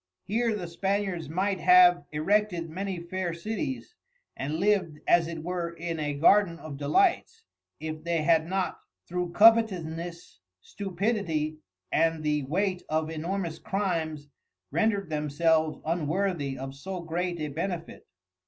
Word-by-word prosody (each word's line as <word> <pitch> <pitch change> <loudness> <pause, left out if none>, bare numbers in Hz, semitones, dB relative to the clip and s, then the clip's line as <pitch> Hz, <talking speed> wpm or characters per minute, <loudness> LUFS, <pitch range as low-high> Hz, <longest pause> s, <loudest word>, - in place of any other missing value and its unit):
Here 230 +2 0
the 180 -4 -4
Spaniards 190 -2 -2
might 190 +3 0
have 360 0 +6
Erected 175 +1 +1
many 190 +1 -3
fair 175 0 -3
Cities, 220 - -4 0.4
and 145 +3 -3
liv'd 185 -3 +1
as 170 -1 +5
it 165 -2 -6
were 175 0 -2
in 170 -1 -4
a 145 -1 -2
Garden 170 +3 +4
of 155 -4 -8
Delights, 380 - +1 0.4
if 155 0 -5
they 170 -2 0
had 160 0 +3
not, 190 +1 -1 0.3
through 180 0 -2
Covetousness, 175 - +3 0.2
Stupidity, 175 - -2 0.3
and 165 -1 +2
the 150 -1 +1
weight 185 +5 0
of 155 +1 0
Enormous 170 +1 -3
Crimes 165 -7 -2 0.5
rendred 205 -5 +1
themselves 155 +1 +1
unworthy 165 -3 -1
of 135 +1 -6
so 180 +6 -6
great 175 +1 -2
a 150 -1 -2
Benefit. 170 +3 -5
170 Hz, 130 wpm, -28 LUFS, 155-195 Hz, 0.5 s, have